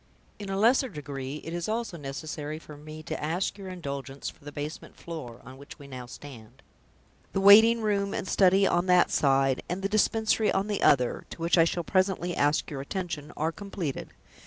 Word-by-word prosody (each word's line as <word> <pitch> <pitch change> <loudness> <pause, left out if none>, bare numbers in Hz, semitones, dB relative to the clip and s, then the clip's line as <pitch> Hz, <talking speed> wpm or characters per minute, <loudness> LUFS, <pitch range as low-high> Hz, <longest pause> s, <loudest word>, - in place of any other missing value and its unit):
In 205 -1 -6
a 195 - -2
lesser 245 +5 +4
degree, 140 - -6
it 165 - -6
is 175 +3 -3
also 225 -4 -2
necessary 150 +1 -5
for 155 -1 -12
me 155 +1 -10
to - - -5
ask 170 +5 -1
your 190 -1 -7
indulgence 140 -6 -6
for - - -24
the 145 - -8
basement 145 +2 -7
floor, 155 -9 -8
on 130 +2 -11
which 140 +1 -12
we 145 - -12
now 130 -2 -8
stand. 130 -2 -12 0.7
The - - +1
waiting 220 +4 +8
room 200 -2 0
and 190 - -3
study 195 +1 +4
on 175 -1 +1
that 180 -1 +4
side, 135 -2 +2
and 185 +2 -3
the - - +2
Dispensary 220 +1 +2
on 195 +1 0
the 210 -1 -2
other 125 -4 +3
(to - - -9
which 165 +1 +2
I 165 -2 +6
shall 170 +1 -1
presently 185 -1 0
ask 145 +2 +1
your 135 -2 -4
attention), 160 -2 -5
are 160 +2 0
completed. 185 -6 -5
165 Hz, 195 wpm, -28 LUFS, 140-195 Hz, 0.7 s, waiting